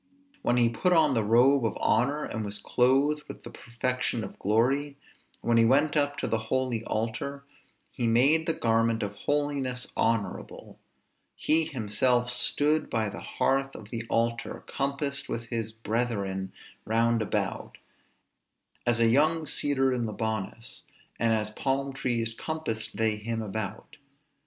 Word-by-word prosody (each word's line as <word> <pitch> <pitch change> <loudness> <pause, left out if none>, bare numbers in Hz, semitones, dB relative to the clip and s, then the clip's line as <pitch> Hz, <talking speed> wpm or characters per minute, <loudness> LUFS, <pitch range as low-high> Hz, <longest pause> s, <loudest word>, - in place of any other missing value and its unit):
When 120 - +1
he 120 -1 +5
put 120 +11 +1
on 155 -4 +4
the 115 -3 +1
robe 125 +5 +4
of 115 - -1
honor, 140 +7 +1
and 110 - -4
was 100 0 -4
clothed 135 +7 +2
with - - -10
the - - -9
perfection 120 -1 -2
of 95 - -9
glory, 135 +7 +1 0.4
when 115 0 +2
he 115 - +6
went 145 +5 +3
up 145 -1 +1
to - - -2
the 115 - 0
holy 130 -4 0
altar, 120 +6 -3 0.5
he 120 -3 -1
made 140 +8 +4
the 165 - +2
garment 115 -2 +1
of 100 -1 -3
holiness 135 +1 -1
honorable. 115 -3 -2 0.6
He 160 +1 +3
himself 125 0 +1
stood 150 +5 +2
by 110 -2 0
the - - -8
hearth 135 0 0
of 105 -1 -11
the 115 -1 -3
altar, 115 0 -1
compassed 140 0 -2
with 115 0 -3
his 115 -2 -2
brethren 105 -4 -2 0.3
round 115 +1 +2
about; 105 - -2 1.1
as 120 -1 +2
a 115 - +5
young 155 +6 +3
cedar 135 -3 +1
in 120 -2 -1
Libanus, 110 +1 -4 0.4
and 115 -1 +2
as 105 -1 0
palm 135 +4 -1
trees 120 -4 -1
compassed 115 -8 -4
they 110 -1 +1
him 115 +1 -3
about. 105 +4 -5
120 Hz, 145 wpm, -28 LUFS, 110-140 Hz, 1.1 s, he